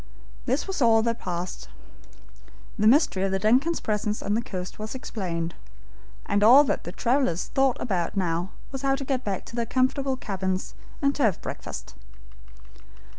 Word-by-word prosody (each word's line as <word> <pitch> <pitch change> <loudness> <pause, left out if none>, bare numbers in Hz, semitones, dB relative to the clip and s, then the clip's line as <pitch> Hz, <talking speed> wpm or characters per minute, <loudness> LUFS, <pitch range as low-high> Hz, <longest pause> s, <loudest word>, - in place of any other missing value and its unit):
This 265 +4 +1
was 385 -6 -4
all 225 -2 +5
that 230 0 -1
passed. 175 - -5 1.1
The 215 - +4
mystery 230 - +4
of 195 0 +1
the 195 - +1
DUNCAN'S 255 - +2
presence 210 0 -1
on 200 - 0
the 225 - +1
coast 185 -3 -6
was 215 +3 -5
explained, 170 -9 -3 0.7
and 205 0 +1
all 255 +7 +9
that 285 - -2
the 175 - -4
travelers 240 - 0
thought 270 -2 +3
about 185 -4 -2
now 175 -1 0 0.2
was 270 -1 -5
to 275 0 0
get 260 -1 -1
back 195 -3 -3
to - - -10
their 235 -1 -1
comfortable 260 +2 +1
cabins, 190 -4 -3 0.3
and 280 0 +3
to 290 - -4
have 215 -9 +3
breakfast. - - -7
220 Hz, 165 wpm, -26 LUFS, 190-260 Hz, 1.1 s, all